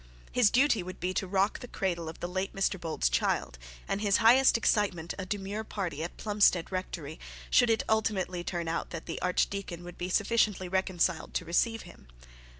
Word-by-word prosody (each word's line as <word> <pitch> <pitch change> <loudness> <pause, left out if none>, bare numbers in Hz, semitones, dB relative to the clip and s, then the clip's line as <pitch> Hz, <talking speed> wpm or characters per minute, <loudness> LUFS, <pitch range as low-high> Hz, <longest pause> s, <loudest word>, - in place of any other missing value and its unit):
His 245 -4 +4
duty 255 -2 +3
would 185 +1 -8
be 180 +1 -2
to 190 - -1
rock 195 +2 +1
the 245 - -8
cradle 175 -7 -2
of 160 - -11
the 175 - -2
late 185 +2 -3
Mr 195 -1 0
Bold's 160 - 0
child, - - 0 0.3
and 195 - -1
his 205 -2 +3
highest 240 +3 +6
excitement 200 -7 0
a 185 - -4
demure 205 +2 -3
party 185 -8 -4
at 170 - -5
Plumstead 205 -5 +2
rectory, 170 -4 -5 0.3
should 245 -2 +5
it 225 -1 +2
ultimately 190 -5 0
turn 175 -2 -3
out 165 +1 -2
that 165 -2 -7
the 165 - -5
archdeacon 180 -1 -1 0.2
be 180 +1 -3
sufficiently 205 -1 +1
reconciled 185 -2 0
to 180 - -1
receive 225 +7 +1
him. 175 - -15
185 Hz, 180 wpm, -29 LUFS, 175-210 Hz, 0.3 s, highest